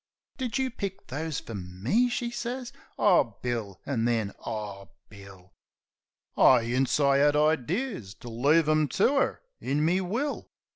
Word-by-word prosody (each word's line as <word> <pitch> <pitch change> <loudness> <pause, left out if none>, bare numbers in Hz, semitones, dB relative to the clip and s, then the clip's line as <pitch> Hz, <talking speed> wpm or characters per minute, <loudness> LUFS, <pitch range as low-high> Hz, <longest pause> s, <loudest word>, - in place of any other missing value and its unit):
"Did 255 -2 -2
you 265 -1 0
pick 200 -5 -6
those 155 +2 -3
fer 115 - -9
me" 100 - 0
she 240 0 -2
sez. 245 +1 -5 0.2
"Oh, - - +3
Bill!" 115 -6 -3
'an 120 -5 -1
then, 115 -4 0
"Oh, 105 -3 -6 0.2
Bill!" 100 -2 -14 0.8
I 125 -2 +6
'ints 125 +4 +1
I 140 -1 +4
'ad 145 +1 +4
idears 155 - 0
to - - -9
leave 145 +8 +3
'em 155 -1 +3
to 270 +8 +3
'er 275 - 0 0.2
in 145 +3 0
me 180 +4 +2
will. 230 +11 -3
145 Hz, 150 wpm, -27 LUFS, -, 0.8 s, I